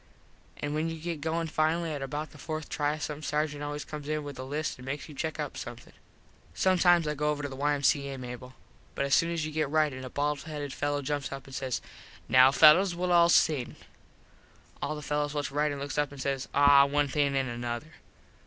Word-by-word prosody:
An 145 0 -3
when 155 +2 0
you 165 - -5
get 165 -2 -4
goin 165 +2 -1
finally 160 +1 0
at 145 - -5
about 145 +3 -4
the 145 - -15
fourth 155 0 -5
try 150 0 -1
some 150 -1 -5
sargent 150 0 -1
always 145 0 -4
comes 150 -1 -7
in 155 0 -1
with 140 -2 -8
a - - -4
list 145 +1 -3
and 125 - -10
makes 145 +2 -4
you 155 - -10
check 155 +2 -4
up 150 -2 -4
something. 120 0 -8 0.6
Sometimes 175 - +4
I 150 - 0
go 150 +1 -1
over 145 -1 -2
to 145 - -3
the 135 - -8
Y.M.C.A., 140 0 +1
Mable. 125 0 -8 0.4
But 140 - 0
as 140 - 0
soon 165 - +4
as 165 -2 -1
you 155 - -4
get 155 -2 -1
ritin 150 -4 +1
a 130 - -6
bald 145 +2 -1
headed 150 -3 -6
fello 145 0 -1
jumps 145 0 -2
up 135 -1 -7
an 135 - -13
says 130 -1 -2 0.5
"Now 130 +1 +7
fellos 165 +6 +6
well 180 +1 -1
all 170 -1 +6
sing." 150 -7 +3 1.1
All 155 - -2
the 150 - -7
fellos 150 0 -1
whats 145 -1 -1
ritin 145 0 0
looks 140 +1 -3
up 145 -1 0
an 140 - -10
says 135 0 -2
"Aw 140 0 +7
one 145 +1 +1
thing 140 0 +1
and 135 -1 0
another." 120 +4 -5
145 Hz, 220 wpm, -29 LUFS, 140-155 Hz, 1.1 s, Now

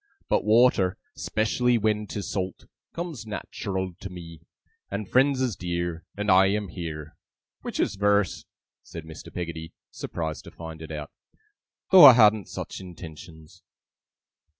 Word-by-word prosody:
But - - +2
water 105 -4 +4 0.2
['specially 120 +3 +1
when 105 -1 0
'tis 100 -1 -5
salt) 95 -2 -4 0.3
comes 165 -9 -6
nat'ral 95 -3 -4
to 95 - -7
me; 85 -3 -10 0.5
and 100 0 -4
friends 135 +3 +3
is 125 -6 0
dear, 85 -1 -3
and 105 -1 +1
I 95 +1 +6
am 100 0 -1
heer. 80 -4 -7 0.5
Which - - -5
is - - +1
verse,' 100 -1 +1 0.4
said 85 -2 -9
Mr. 80 -1 -10
Peggotty, 85 -2 -6 0.2
surprised 80 -2 -5
to - - -10
find 80 -1 -9
it 80 - -8
out, 75 -2 -6 0.8
'though 190 -2 +11
I 130 - +12
hadn't 110 -4 +4
such - - -6
intentions. 80 -3 -11
95 Hz, 140 wpm, -26 LUFS, 85-105 Hz, 0.8 s, I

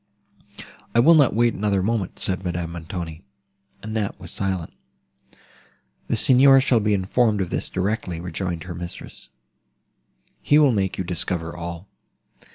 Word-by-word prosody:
"I - - +5
will 160 +8 +7
not 145 -8 +4
wait 120 +1 +3
another 100 -2 0
moment," 105 -3 -2
said 95 0 -2
Madame 85 -2 -3
Montoni. 85 -1 -6 0.6
Annette 110 -2 -3
was - - -7
silent. 95 -4 -3 1.3
"The - - 0
Signor 135 +1 +6
shall 130 -3 +3
be 105 -1 +1
informed 105 +3 +1
of 95 -3 -2
this - - -2
directly," 95 -3 -2
rejoined 90 -1 -4
her 90 -1 -7
mistress; 85 0 -9 1.1
"he 145 - +4
will 145 -3 +5
make 95 -4 -1
you 95 - -2
discover 85 -1 -3
all." 85 +2 -7
95 Hz, 140 wpm, -23 LUFS, 85-110 Hz, 1.3 s, will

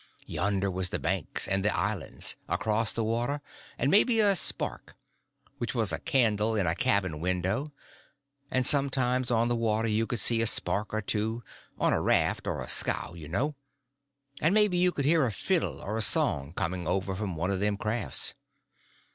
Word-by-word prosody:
Yonder 100 0 -1
was 90 0 0
the - - -2
banks - - -1
and 95 -1 0
the 105 - 0
islands, 100 -4 -2
across 110 0 0
the 115 - -2
water; 120 +6 -1 0.4
and 135 +4 0
maybe 225 +3 +4
a 205 -2 +4
spark—which 120 -7 -3
was 110 -7 +2
a - - -2
candle 115 -7 +1
in 100 -3 +1
a 80 - +1
cabin 95 -7 0
window; 95 - -2 0.8
and 130 0 +1
sometimes 130 -3 +2
on 115 -1 +2
the 120 - 0
water 115 -1 0
you 110 +1 0
could 120 - -1
see 115 +3 +4
a 115 - +3
spark 105 -1 +1
or 110 0 -2
two—on 110 +3 -2
a - - 0
raft - - +1
or - - -3
a - - -9
scow, - - 0
you 80 -4 -10
know; 125 - -1 0.9
and 165 +6 +2
maybe 210 -4 +4
you 180 0 +3
could 140 -5 -3
hear 160 +1 +4
a 120 - 0
fiddle 100 - -1
or 110 +2 -4
a - - 0
song 70 -8 +3
coming 90 0 -3
over 95 0 -1
from 95 -3 -4
one 90 +5 -2
of 95 - -2
them 105 0 0
crafts. 110 +1 0
110 Hz, 180 wpm, -28 LUFS, 95-125 Hz, 0.9 s, maybe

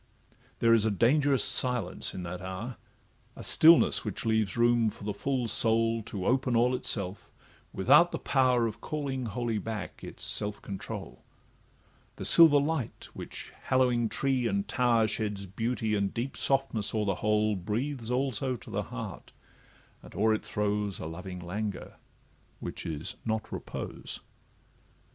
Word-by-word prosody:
There 115 0 +4
is 115 -2 +4
a 110 - +2
dangerous 135 +6 +3
silence 125 -7 0
in 90 - -5
that 90 +1 -6
hour, 95 +6 -6 0.6
A - - -9
stillness, 165 +1 +5
which - - -4
leaves 110 -2 +1
room 120 -1 +4
for 100 - -12
the 105 0 -2
full 130 -1 -1
soul 115 +1 +3
To 100 -3 -6
open 130 0 +1
all 120 +2 +3
itself, 100 -6 -2 0.4
without 145 - +5
the - - -2
power 130 -3 +2
Of 115 0 -5
calling 135 -5 -3
wholly 115 0 -2
back 105 -3 -6
its - - -8
self 105 0 0
control; 95 -1 -7 0.9
The - - -6
silver 160 -4 +8
light 145 -4 -3
which, - - -8
hallowing 125 -3 +2
tree 130 -1 0
and 200 +1 -1
tower, 120 -3 +2
Sheds 105 -2 -2
beauty 110 +3 -2
and 100 -2 0
deep 125 +4 -4
softness 135 -6 0
o'er 105 -1 +1
the 100 -2 0
whole, 105 0 +2
Breathes 115 +6 -3
also 130 0 0
to 115 - -11
the - - -1
heart, - - -7 0.7
and - - -14
o'er 110 +3 +3
it 110 - -2
throws 105 -1 -1
A - - -6
loving 90 +3 -7
languor, 100 +3 -5 0.6
which - - -4
is 80 +8 -4
not 110 -1 -2
repose. - - -6
115 Hz, 150 wpm, -29 LUFS, 105-125 Hz, 0.9 s, silver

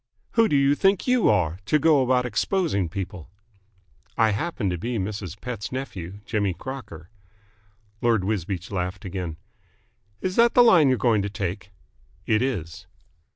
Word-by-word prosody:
"Who 230 -1 +3
do - - +2
you 140 0 +4
think 195 +5 +2
you 250 -3 +3
are, 85 0 +1
to 155 - +4
go 150 -1 +4
about 125 -1 +2
exposing 125 - 0
people?" 90 -2 -6 0.9
"I 110 -1 +4
happen 125 -1 -2
to 90 - -2
be 120 +5 -3
Mrs. 100 -2 -5
Pett's 115 -3 -5
nephew, 100 -8 -6
Jimmy 100 -5 -1
Crocker." 95 - -8 0.9
Lord 115 -5 +2
Wisbeach 95 -3 -3
laughed 90 0 -3
again. 90 -4 -5 0.8
"Is 185 0 -3
that 235 0 +5
the 245 - +8
line 170 - +6
you 130 - +4
are - - -6
going 115 -3 +2
to 100 - -3
take?" 100 -1 -4 0.6
"It 110 0 +2
is." 100 - -3
110 Hz, 155 wpm, -24 LUFS, 95-135 Hz, 0.9 s, the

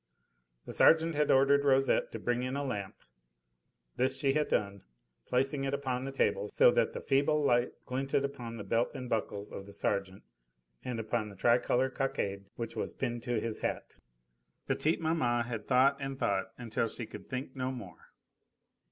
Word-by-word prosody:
The - - -6
sergeant 165 0 +5
had 150 -1 +1
ordered 140 +1 +5
Rosette 135 -1 +3
to - - -5
bring 120 +2 -1
in 130 +1 -2
a 140 - -1
lamp. 105 -7 -4 1.0
This 130 +1 +1
she 135 0 +2
had 150 0 +1
done, 100 -1 -1 0.5
placing 135 +2 +1
it 135 0 0
upon 130 -2 -2
the 135 - -4
table 135 - 0
so - - +6
that - - +1
the - - -5
feeble 145 +2 +2
light 120 -2 +2
glinted 135 +2 0
upon 120 -4 -6
the 105 - -6
belt 115 +3 +1
and 130 -2 -5
buckles 105 -3 -2
of 95 - -8
the - - -10
sergeant 100 -1 -2 0.6
and 125 -2 -3
upon 110 0 -2
the 100 - -12
tricolour 125 +4 +2
cockade 100 -8 -2
which 115 -1 -5
was - - -3
pinned 120 -3 -2
to 120 -2 -1
his 110 0 -4
hat. - - -4 0.7
Petite 160 +2 +1
maman 125 -8 +1
had 115 -3 -5
thought 135 +2 +4
and 135 0 -4
thought 100 -6 0
until 115 -1 -1
she 115 +1 -6
could - - -11
think 130 0 -5
no 130 0 -2
more. 105 -10 -10
125 Hz, 180 wpm, -31 LUFS, 115-135 Hz, 1.0 s, so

